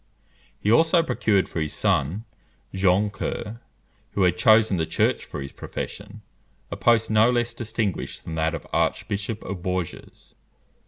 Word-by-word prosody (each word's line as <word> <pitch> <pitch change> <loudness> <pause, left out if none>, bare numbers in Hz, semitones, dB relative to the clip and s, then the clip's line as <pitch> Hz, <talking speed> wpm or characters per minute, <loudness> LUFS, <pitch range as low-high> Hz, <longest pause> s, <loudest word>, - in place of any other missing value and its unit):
He 105 - +1
also 165 +6 +5
procured 110 -8 +1
for 80 - -4
his 75 - -2
son, 80 - 0 0.5
Jean 95 +2 +2
Coeur, 110 +3 -5 0.5
who 100 - +1
had 90 -1 +3
chosen 110 +1 +4
the 80 -1 -1
Church - - +1
for 70 - -6
his 70 - -8
profession, 105 +1 -7 0.5
a - - -3
post 115 -2 +2
no 110 +2 +5
less 120 -1 0
distinguished 110 -5 -3
than 80 - -7
that 80 +1 0
of 80 - -8
Archbishop 105 +2 -1
of 90 -2 -6
Bourges. 90 -2 -5
100 Hz, 150 wpm, -24 LUFS, 90-115 Hz, 0.5 s, also